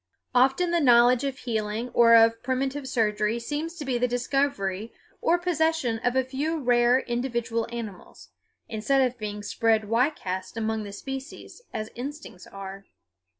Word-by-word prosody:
Often 270 +8 +3
the 345 - +2
knowledge 245 -2 +5
of 275 -1 -2
healing 220 -1 -3
or 230 -1 +6
of 230 0 +5
primitive 265 +2 -2
surgery 210 -1 +1
seems 295 +7 -4
to 305 -4 -7
be 255 -2 0
the 250 - +2
discovery 245 -5 -1 0.3
or 345 - +3
possession 320 -9 0
of 245 +2 0
a 260 - +3
few 285 +5 -2
rare 245 -1 +3
individual 235 -2 -2
animals, 220 -6 -8 0.4
instead 245 +5 +1
of 250 -1 -1
being 210 -1 -5
spread 220 +1 +1
widecast 215 -5 -1
among 220 -1 -2
the 200 - -7
species, 270 - -8
as 215 0 -5
instincts 275 - -8
are. 195 0 -9
240 Hz, 150 wpm, -26 LUFS, 220-270 Hz, 0.4 s, or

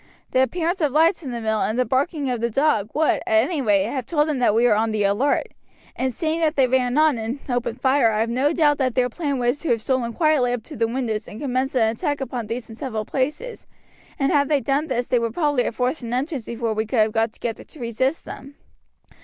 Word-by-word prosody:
The 255 - +3
appearance 335 +7 0
of 295 -3 +2
lights 325 +6 +3
in 280 - -6
the 240 -1 -4
mill 220 -1 -1
and 220 - -1
the 255 - +2
barking 280 +3 0
of 240 -2 -2
the 235 - +1
dog, 225 -5 +1
would, 310 +1 +3
at 220 0 +4
any 295 +2 -2
rate, 205 -5 +3
have 235 +3 -4
told 300 -2 +1
them 295 -4 -1
that 230 -4 +3
we 235 +2 +4
were 240 - +5
on 220 +1 +1
the 215 -1 0
alert, 205 +9 +1 0.5
and 260 0 -1
seeing 315 +6 -2
that 320 -1 +1
they 270 - +4
ran 250 +1 +1
on 305 -5 +4
and 225 +4 -3
opened 245 -1 -2
fire 260 -3 +3
I 215 0 0
have 230 - 0
no 265 +5 +2
doubt 300 -3 +2
that 255 -3 0
their 250 -1 +2
plan 285 +1 -2
was 245 +3 0
to 330 - -4
have 230 -2 +2
stolen 255 -3 0
quietly 300 -6 +2
up 240 -3 -4
to - - -10
the 230 0 +1
windows 230 -3 -3
and 215 - -9
commenced 265 -1 -1
an 225 -3 +4
attack 290 +5 -2
upon 250 -4 -4
these 230 +1 -4
in 225 - -10
several 220 -3 -4
places, 300 - -3 0.5
and 275 -2 +1
had 285 -2 +2
they 295 -2 +3
done 280 +3 0
this 245 -3 -1
they 245 - +1
would 230 -1 -3
probably 290 -6 +1
have - - -3
forced 255 +5 -1
an 235 0 -3
entrance 270 -2 -3
before 230 -1 -2
we 220 0 -2
could 240 - -2
have 215 0 +3
got 225 0 0
together 230 -1 -5
to 310 - -15
resist 260 +5 -1
them. 280 +1 -10
255 Hz, 255 wpm, -22 LUFS, 230-290 Hz, 0.5 s, were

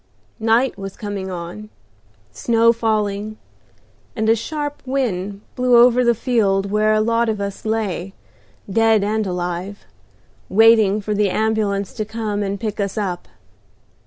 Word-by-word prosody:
Night 225 +1 +2
was 195 -1 -7
coming 200 -2 -5
on, 180 +4 -7 0.6
snow 230 - +3
falling, 215 -2 -1 0.8
and 220 -2 -1
a 225 - +5
sharp 290 +5 -4
wind 205 -7 -2
blew 250 -1 +4
over 245 +1 +6
the 235 -1 +3
field 200 -5 +1
where 215 +1 +2
a - - +2
lot 230 +1 +1
of 215 -2 -2
us 200 +1 -5
lay, 205 -4 -2 0.5
dead 225 +1 +3
and 215 0 -1
alive, 180 +2 -4 0.6
waiting 215 -1 +5
for 210 +1 -2
the 205 -1 +1
ambulance 205 -1 -1
to 215 - -3
come 215 -1 -3
and 200 0 -3
pick 215 -2 -4
us 200 +1 -2
up. 185 -4 -3
215 Hz, 140 wpm, -20 LUFS, 200-225 Hz, 0.8 s, over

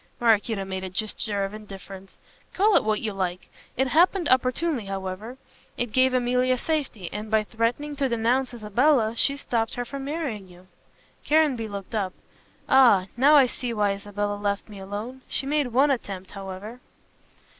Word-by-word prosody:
Maraquito 220 -3 +2
made 190 0 -4
a 190 - -4
gesture 205 +1 -2
of 195 - -7
indifference. 195 -2 -10 0.4
"Call 410 +2 +4
it - - +5
what 215 -1 0
you 215 -2 -2
like. 185 -2 -3 0.3
It 265 +1 +2
happened 345 +3 +3
opportunely 255 0 +1
however. 195 +5 -5 0.4
It 240 -2 -2
gave 260 +2 +4
Emilia 250 +1 +2
safety, 270 - -2
and 210 +1 -5
by 220 0 +3
threatening 235 +7 -2
to 270 -2 +1
denounce 240 +3 +1
Isabella, 235 +1 +2
she 280 +4 +3
stopped 230 -4 -2
her 245 -1 -3
from 275 +2 -6
marrying 280 - -4
you." 180 0 -17 0.6
Caranby 295 -7 +2
looked 200 0 -7
up. 195 -4 -1 0.5
"Ah! 245 -9 +6
Now 280 +5 +6
I 280 -3 +8
see 245 -1 -4
why 205 -2 +2
Isabella 205 +1 -3
left 205 +1 -2
me 205 -2 -10
alone. 210 +7 -6
She - - -2
made 290 -1 +1
one 265 +4 +3
attempt, 195 -7 -4
however." 195 +4 -8
225 Hz, 165 wpm, -25 LUFS, 200-260 Hz, 0.6 s, I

